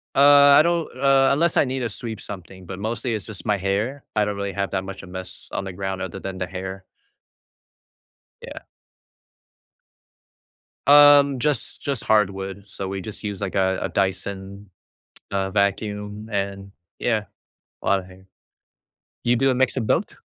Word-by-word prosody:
Uh, - - +4 0.4
I - - +8
don't, 170 0 0
uh, 135 0 +4
unless 165 +4 +1
I - - +5
need 130 0 -3
to 120 - -1
sweep 110 0 -6
something, 95 -1 -9
but 95 +1 -7
mostly 115 +3 -2
it's 105 - -4
just 110 -3 -7
my 105 - +2
hair. 105 +9 -2
I 105 - +4
don't 105 0 -3
really 100 0 -3
have 100 0 -2
that 95 -1 -2
much 95 0 -8
of 95 - -11
mess 95 0 -7
on - - -3
the 95 - -6
ground 95 0 -4
other 95 +1 -5
than 95 -1 -6
the 95 - -2
hair. 95 +1 -7 1.6
Yeah. 480 - -8 2.3
Um, 145 -1 +7
just 135 -1 -1
just 140 -5 -2
hardwood, 95 -2 0
so, 95 -1 -6
we 95 0 -4
just 105 +2 -7
use, 100 -3 -4
like, 100 - -3
a 95 -1 +1
a - - -1
Dyson, 100 +1 -3 0.6
uh, 95 -1 -1
vacuum, 105 +1 -1
and 100 -1 -3 0.3
yeah, 110 -3 0 0.6
a - - -10
lotta 95 -1 +2
hair. 95 +1 -16 1.0
You 120 +1 +4
do 135 +3 +2
a - - +3
mix 130 0 +1
of 130 -4 -1
both? - - 0
100 Hz, 170 wpm, -23 LUFS, 95-120 Hz, 2.3 s, I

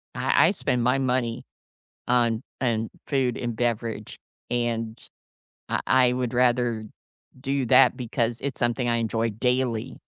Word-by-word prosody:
I - - +4
I - - +3
spend 125 -2 -1
my 130 +2 +3
money 125 -3 -1 0.6
on 120 -2 +2 0.2
on 115 -3 0 0.2
food 130 -3 0
and 120 -2 -3
beverage, 115 -2 -2 0.3
and 115 -2 -2 0.7
I - - 0
I 125 -1 +5
would 125 -2 -2
rather 120 -3 +1 0.5
do 135 0 -1
that 125 +2 +5
because 120 -1 -1
it's 140 -2 -4
something 120 +1 0
I 120 0 +2
enjoy 115 0 -1
daily. 125 +1 -1
120 Hz, 135 wpm, -25 LUFS, 115-125 Hz, 0.7 s, I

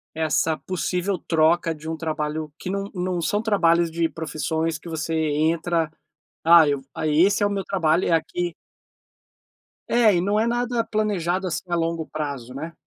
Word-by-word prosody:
essa 160 0 +1
possível 185 +1 -2
troca 165 +1 +2
de 155 +1 -8
um 160 - -2
trabalho 155 -1 -3
que - - -5
não 195 +1 -2
não 180 -2 -2
são 205 +5 0
trabalhos 170 -6 +3
de 165 0 0
profissões 160 0 -2
que 170 +2 -11
você 160 0 -3
entra: 160 +2 +1 0.5
"Ah, 170 0 +8 0.4
esse 180 +7 +3
é - - +4
o - - -3
meu 200 -1 -2
trabalho, 170 -3 +1
é - - +1
aqui" 175 +1 -1 1.3
É, 230 -4 +4
e 175 - +2
não 205 +3 +1
é 220 - +2
nada 240 0 0
planejado, 195 -5 -1
assim, 170 -4 -2
a 175 - 0
longo 165 -1 -1
prazo, 140 -5 -5
né? 155 +5 -6
170 Hz, 165 wpm, -23 LUFS, 160-185 Hz, 1.3 s, Ah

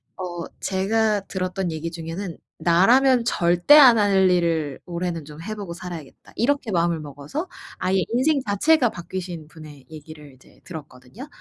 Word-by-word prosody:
어 175 -2 -5 0.2
제가 210 +2 0
들었던 185 -1 -3
얘기 160 +1 -5
중에는 165 +2 -6 0.2
'나라면 235 +10 +4
절대 175 +4 +4
안 255 -6 +8
할 195 -3 +3
일을 165 -5 0
올해는 170 -2 -4
좀 150 +1 -11
해보고 200 -2 -6
살아야겠다.' 170 -5 -10
이렇게 270 -1 0
마음을 170 -2 +1
먹어서 145 - -6 0.3
아예 185 0 0
인생 275 +6 +2
자체가 245 +6 +3
바뀌신 175 -3 -7
분의 155 -4 -13
얘기를 150 -2 -12
이제 130 - -22
들었거든요. 155 - -11
180 Hz, 330 characters per minute, -23 LUFS, 160-210 Hz, 0.3 s, 안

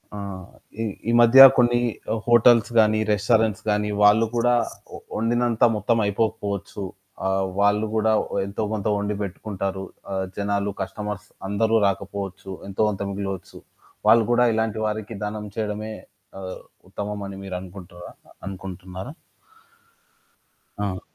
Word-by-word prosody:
ఆ! - - -5 0.6
ఈ - - 0 0.3
ఈ - - +3
మధ్య 120 +3 +7 0.2
కొన్ని 120 -1 +4 0.5
హోటల్స్ 120 -1 +5
గాని, 110 0 +4
రెస్టారెంట్స్ 110 0 +1
గాని, 105 0 +1
వాళ్ళు 105 +2 +6
కూడా 120 +1 +3 0.6
వండినంత 120 +1 +1
మొత్తం 105 +3 +1
అయిపోకపోవచ్చు. 100 -1 -2 0.4
ఆ! - - +1 0.3
వాళ్ళు 105 +1 +3
గూడా 110 0 +3 0.3
ఎంతో 100 +3 -4
కొంత 105 -1 -2
వండి 105 +1 -2
పెట్టుకుంటారు. 95 0 -4 0.3
ఆ! - - -2 0.2
జనాలు 100 0 -1
కస్టమర్స్ 105 +2 -5 0.2
అందరూ 110 +2 +2
రాకపోవచ్చు. 100 0 -4 0.2
ఎంతో 95 - -3
కొంత 100 -2 -4
మిగిలవచ్చు. 95 -2 -5 0.5
వాళ్ళు 115 -1 +6
కూడా 125 +1 +4
ఇలాంటి 110 0 -1
వారికి 110 +1 -3
దానం 105 0 -4
చేయడమే 110 0 -3 0.5
ఆ! - - -8 0.5
ఉత్తమమని 100 -1 -5
మీరనుకుంటుర్రా? 90 -1 -8 0.3
అనుకుంటున్నారా? 95 - -7 1.7
అవును. 95 -2 -3
105 Hz, 115 wpm, -23 LUFS, 100-110 Hz, 1.7 s, మధ్య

